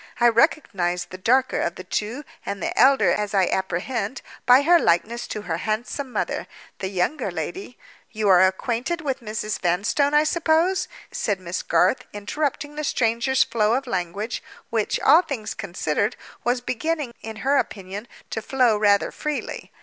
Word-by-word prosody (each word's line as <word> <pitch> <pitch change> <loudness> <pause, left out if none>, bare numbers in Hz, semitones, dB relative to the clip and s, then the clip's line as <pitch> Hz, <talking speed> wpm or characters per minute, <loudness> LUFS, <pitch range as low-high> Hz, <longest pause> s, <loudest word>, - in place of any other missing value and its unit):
I 240 0 +6
recognized 195 - +1
the 185 - -8
darker 255 +6 +2
of 170 - -1
the 185 - -8
two, 215 +9 -3 0.2
and 200 - -4
the - - -3
elder 265 -10 +5
as 210 +1 -1
I 190 -2 +4
apprehend, 200 +6 -2 0.2
by 250 +3 +7
her 345 +3 +6
likeness 230 - +1
to 210 - -5
her 165 - -2
handsome 230 +7 -3
mother. - - -2 0.3
The 190 - -2
younger 190 +10 -1
lady—" 370 -10 -5 0.3
"You 215 -2 -2
are 185 -1 +7
acquainted 240 - -2
with 275 -4 -2
Mrs. 215 -1 -3
Vanstone, 205 - +1
I 300 - +6
suppose?" 330 +3 +2 0.2
said 205 -3 -1
Miss 180 -1 -4
Garth, 180 +8 +2
interrupting 290 +7 -3
the 305 - -2
stranger's 240 0 +2
flow 225 -1 +1
of 270 +2 -1
language, 200 +1 -3 0.3
which, 220 -2 0
all 310 +5 +7
things 270 -11 -5
considered, 200 +2 -1 0.3
was 245 +1 +1
beginning, 290 +1 -2
in 220 0 -7
her 280 +1 +4
opinion, 200 -1 -3 0.2
to 225 - -2
flow 245 -2 +2
rather 205 -1 +3
freely. 300 -1 -4
225 Hz, 160 wpm, -23 LUFS, 200-270 Hz, 0.3 s, by